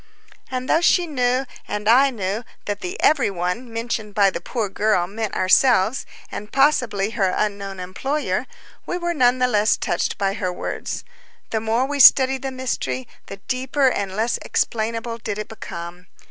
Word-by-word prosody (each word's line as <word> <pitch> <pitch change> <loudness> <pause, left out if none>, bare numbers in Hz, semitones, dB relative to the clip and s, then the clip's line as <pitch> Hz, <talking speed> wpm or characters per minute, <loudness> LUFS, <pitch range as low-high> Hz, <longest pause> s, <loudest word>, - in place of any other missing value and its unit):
And 255 0 -4
though 325 - +3
she 350 0 +4
knew 255 -3 0 0.2
and 210 0 -4
I 260 +5 +6
knew 210 -2 -3 0.2
that 205 0 -3
the 180 - -5
"every 275 -8 +4
one" 185 +6 -3
mentioned 225 -2 -4
by 200 -2 +4
the 170 - -5
poor 225 +3 -2
girl 200 -2 +1
meant 215 +3 -4
ourselves, 215 +4 +3 0.2
and 210 +1 -7
possibly 245 -7 +2
her 195 -4 +1
unknown 200 -2 -2
employer, 265 +12 -2 0.4
we 355 - -2
were 345 -1 -1
none 250 -4 +3
the 250 0 +2
less 215 -2 +2
touched - - -1
by 195 -1 0
her 185 -3 -2
words. 180 - -5 0.5
The 220 - +1
more 225 +3 +1
we 285 +1 -3
studied 265 0 +7
the 270 - -3
mystery, 225 - -3 0.2
the 195 - -8
deeper 260 +1 +1
and 195 -5 -3
less 225 +3 0
explainable 230 +1 -2
did 210 -2 -4
it 215 - -4
become. 175 -4 -8
225 Hz, 170 wpm, -22 LUFS, 195-255 Hz, 0.5 s, studied